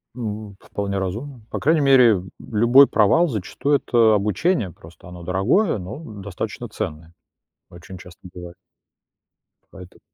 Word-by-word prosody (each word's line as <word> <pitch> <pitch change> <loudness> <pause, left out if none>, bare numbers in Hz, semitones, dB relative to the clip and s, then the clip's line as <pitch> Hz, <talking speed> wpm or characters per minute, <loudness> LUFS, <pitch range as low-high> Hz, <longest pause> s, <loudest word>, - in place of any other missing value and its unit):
Б 105 -4 -6
вполне 100 -1 -4
разумно. 115 +8 -5
По - - -3
крайней 155 +1 +2
мере, 135 -4 +6
л 95 -3 -3 0.2
любой 120 +5 +4
провал, 115 +12 +3
зачастую, 135 - -1
это 115 -5 +3
обучение. 105 - 0
Просто 80 +2 -16
оно 90 -1 -11
дорогое, 105 - +1
но 95 - -8
достаточно 100 - -7
ценное, 80 +2 -7 0.6
очень 90 +2 -12
часто 90 -1 -14
бывает. 90 -1 -10 1.2
Поэтому 90 -2 -13
105 Hz, 130 wpm, -21 LUFS, 90-125 Hz, 1.2 s, мере